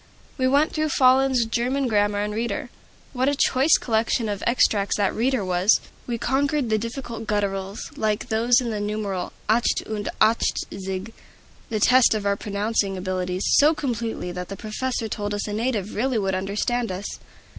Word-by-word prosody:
We 255 -2 +1
went 285 +4 +3
through 310 0 -1
Follen's 260 -2 +4
German 250 +4 0
Grammar 205 -2 +1
and 210 0 -2
Reader: 230 +2 -3 0.4
what 260 +1 +1
a 285 - 0
choice 275 +2 +4
collection 225 0 0
of 205 -1 -3
extracts 210 -4 +2
that 200 -2 +1
"Reader" 245 -2 0
was! 185 +3 +3 0.3
We 240 -1 -2
conquered 270 +1 0
the 215 - +3
difficult 230 -1 -6
gutturals, 200 -1 -2
like 215 +2 -1
those 235 +3 +3
in 240 -3 -3
the 210 - -3
numeral 205 -3 -3 0.2
"acht 230 +3 +2
und 210 -2 -4
achtzig" 195 -2 0 0.6
(the 220 -2 -1
test 250 +1 +5
of 210 -1 -3
our 200 0 +2
pronouncing 200 -1 -1
abilities) 185 0 -2 0.2
so 305 +3 +5
completely 230 -9 -3
that 180 0 -6
the 195 - -6
professor 230 +2 -3
told 205 -1 -3
us 205 - -3
a 210 - -4
native 215 -3 -2
really 250 +2 0
would 195 -2 0
understand 205 +5 -1
us! 185 +2 -5
220 Hz, 165 wpm, -24 LUFS, 200-250 Hz, 0.6 s, test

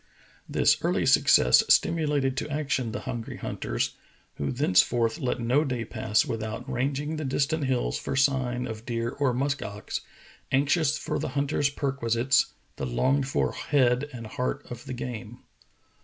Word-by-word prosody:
This - - +3
early - - +1
success 60 0 +6
stimulated 145 -5 +3
to 140 - -2
action 140 -5 -1
the 125 - -4
hungry 120 -4 -5
hunters, - - -3 0.4
who 70 - -2
thenceforth 120 - +2
let 130 -3 -1
no 125 +6 +2
day 125 -5 -2
pass 110 -1 +1
without 110 +2 -4
ranging 140 +4 -2
the 155 - -3
distant 140 +2 0
hills 125 - 0
for - - -3
sign 130 -2 +1
of 110 -1 -6
deer 115 -1 -2
or 140 -2 0
musk 140 +3 -1
ox, 100 0 -5 0.5
anxious 140 +2 +2
for - - -3
the - - -2
hunter's 145 0 +1
perquisites 130 -3 +1
— - - -40
the - - -3
longed 130 - +1
for 135 - 0
head 130 0 +1
and 120 -3 -8
heart 125 +5 -3
of 120 -1 -8
the - - -5
game. 120 -2 -7
130 Hz, 155 wpm, -27 LUFS, 115-140 Hz, 0.5 s, success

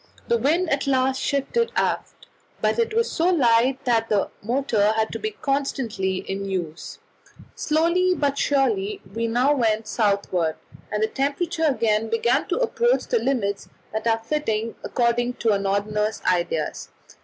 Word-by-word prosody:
The 235 - +3
wind 325 +9 +2
at 275 0 0
last 265 0 +1
shifted 285 - 0
aft, - - -2 0.3
but - - +1
it 455 -1 0
was 460 0 +1
so 335 +2 +1
light 260 -3 +3
that 230 -2 +1
the 205 -2 +1
motor 220 -3 +1
had 220 0 0
to - - -4
be 435 - -2
constantly 265 - -2
in 195 +1 -3
use. 175 -5 -5 0.6
Slowly 340 +4 +2
but 285 -3 0
surely 240 -9 0
we 230 +1 -1
now 250 +5 +3
went 220 -5 0
southward, 200 -7 0 0.4
and 210 0 0
the - - +3
temperature 300 +7 -1
again 225 -6 +1
began 230 +1 +1
to - - -1
approach 485 0 +1
the 475 - +2
limits 220 - -1 0.2
that 220 +2 -2
are 225 -1 +3
fitting 225 -3 -2
according 240 +1 0
to 230 -3 +1
a 200 - +2
Northerner's 210 +2 -1
ideas. 170 -3 -1
235 Hz, 155 wpm, -23 LUFS, 210-280 Hz, 0.6 s, The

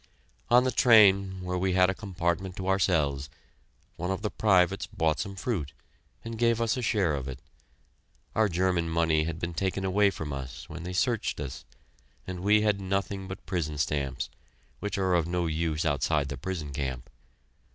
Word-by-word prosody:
On 125 +1 +6
the 130 - +1
train, 100 -6 +5
where 90 0 -2
we 95 0 +1
had 90 0 +4
a - - -3
compartment 90 -2 -2
to 95 -1 -5
ourselves, 75 -8 +1 0.7
one 90 +2 -3
of 95 +2 -2
the 105 - -1
privates 100 -1 +2
bought 80 -7 0
some 100 -1 -4
fruit, 90 - -3 0.5
and 115 -1 -6
gave 115 -1 +3
us 115 -1 +1
a 125 - -3
share 100 -8 +1
of 70 -2 -3
it. 65 -1 -5 1.0
Our 110 -1 +3
German 90 -1 +1
money 80 -1 +2
had 80 -1 -3
been 85 0 -4
taken 95 +2 -1
away 100 +2 +4
from 80 -6 -5
us 65 -2 -7
when 85 +2 -8
they 90 +2 -5
searched 115 +3 0
us, 70 -3 -6 0.6
and 90 -1 -5
we 105 +3 +4
had 105 -2 +1
nothing 95 0 -2
but 95 0 -8
prison 75 -5 -2
stamps, 70 -4 -2 0.5
which 105 -1 -3
are 95 -2 +1
of 85 -2 +2
no 90 0 0
use 80 0 -1
outside 75 0 +1
the 70 - -3
prison 80 -2 -5
camp. 65 -3 -4
90 Hz, 180 wpm, -28 LUFS, 80-100 Hz, 1.0 s, On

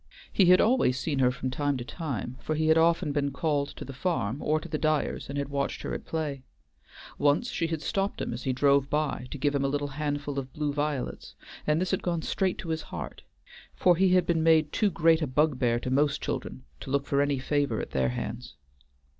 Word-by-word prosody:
He 195 - +5
had 180 +1 +7
always 225 - +3
seen 140 0 -1
her 125 -1 +5
from 130 0 -3
time 145 +1 0
to 120 - -6
time, 130 - -4
for 155 - -2
he 155 +1 +1
had 160 - +6
often 165 -2 +3
been 140 -1 0
called 145 0 0
to - - -7
the 135 - -8
farm 135 - -1
or 155 +1 +1
to - - -9
the 155 - -3
Dyers 155 -3 0
and 140 - -4
had 140 -1 -2
watched 140 -1 -2
her - - -3
at - - -5
play. 150 -4 -3 0.8
Once 145 +12 +2
she 165 - -1
had 160 -2 -3
stopped 195 0 -1
him - - -3
as 120 - -5
he 130 - -1
drove 140 +1 +3
by 150 -4 -1
to - - -6
give 145 +1 +1
him 140 -1 0
a - - +2
little 145 +1 -1
handful 145 0 -3
of 130 -1 -7
blue 150 -1 -2
violets, 145 -2 -3 0.3
and 150 +1 +3
this 185 0 -1
had 190 - 0
gone 170 -3 -1
straight 190 -2 0
to 165 - -7
his 160 0 -1
heart, - - -7 0.5
for 180 -1 +4
he 185 +1 +3
had 180 - +4
been 165 -2 +1
made 160 -2 +4
too 210 - +2
great 165 -1 +3
a 155 - 0
bugbear 130 -3 +2
to 125 - -3
most 140 +2 +2
children 65 - -4 0.2
to - - -8
look 140 +1 0
for 140 0 +1
any 145 -1 +1
favor 145 +2 0
at - - -5
their 65 -1 +1
hands. 65 +2 -5
145 Hz, 230 wpm, -28 LUFS, 135-160 Hz, 0.8 s, had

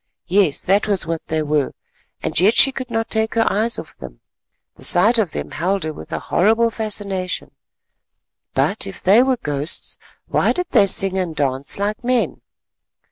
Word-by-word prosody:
Yes, 180 -5 +2
that 200 +3 +2
was 200 -5 0
what 165 -1 -4
they 155 -1 -1
were, 150 -2 0 0.5
and - - +1
yet 205 +6 +4
she 270 - +6
could 260 -1 -6
not 225 -1 -1
take 220 0 -1
her 225 0 +3
eyes 220 +3 0
off 155 - -9
them—the - - -16
sight 220 +7 +4
of 195 -7 0
them - - -5
held 185 +3 -1
her 155 0 -3
with - - -11
a - - -2
horrible 225 +5 +2
fascination. 200 -4 -2 1.0
But - - 0
if 95 - -8
they 200 +6 +6
were 260 0 +2
ghosts, 145 -3 -2 0.3
why - - +1
did 360 -1 -3
they 200 - +5
sing 190 0 +1
and 175 -4 -3
dance 135 -1 -1
like 205 +3 -2
men? 250 0 0
195 Hz, 175 wpm, -20 LUFS, 160-225 Hz, 1.0 s, she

